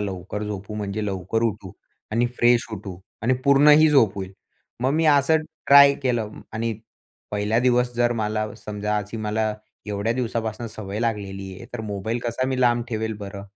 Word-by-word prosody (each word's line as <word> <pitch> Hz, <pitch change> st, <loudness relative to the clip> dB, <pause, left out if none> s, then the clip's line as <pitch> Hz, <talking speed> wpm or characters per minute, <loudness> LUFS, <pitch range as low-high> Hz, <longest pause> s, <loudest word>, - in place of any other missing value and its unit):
लवकर 100 Hz, +1 st, -4 dB
झोपू, 105 Hz, 0 st, -6 dB
म्हणजे 105 Hz, 0 st, -3 dB
लवकर 100 Hz, +4 st, -2 dB
उठू 100 Hz, -4 st, -2 dB, 0.4 s
आणि 120 Hz, +2 st, +2 dB
फ्रेश 120 Hz, +1 st, +4 dB
उठू 95 Hz, -3 st, -7 dB, 0.2 s
आणि 130 Hz, +3 st, +3 dB
पूर्णही 150 Hz, +2 st, +6 dB
झोप 115 Hz, -9 st, +4 dB
होईल. 95 Hz, -1 st, -6 dB, 0.5 s
मग 130 Hz, +2 st, +1 dB
मी 160 Hz, +1 st, +1 dB
असं 145 Hz, +1 st, +5 dB, 0.3 s
ट्राय 140 Hz, 0 st, +8 dB
केलं 120 Hz, -5 st, 0 dB, 0.2 s
आणि 115 Hz, +1 st, -1 dB, 0.6 s
पहिल्या 105 Hz, +2 st, 0 dB
दिवस 125 Hz, 0 st, +2 dB
जर 120 Hz, 0 st, +2 dB
मला 110 Hz, -1 st, -1 dB
समजा, 105 Hz, 0 st, -3 dB
अशी 105 Hz, +2 st, -6 dB
मला 110 Hz, 0 st, -1 dB, 0.3 s
एवढ्या 105 Hz, +2 st, -1 dB
दिवसापासून 115 Hz, -2 st, -3 dB
सवय 105 Hz, -2 st, -6 dB
लागलेली 100 Hz, -4 st, -3 dB
आहे. -, -, -11 dB
तर 120 Hz, -, -4 dB
मोबाईल 110 Hz, +2 st, -3 dB
कसा 120 Hz, +2 st, -1 dB
मी 130 Hz, -1 st, -1 dB
लांब 120 Hz, -1 st, +3 dB
ठेवेल 110 Hz, -2 st, -2 dB
बरं. 100 Hz, -1 st, -8 dB
110 Hz, 165 wpm, -23 LUFS, 105-120 Hz, 0.6 s, ट्राय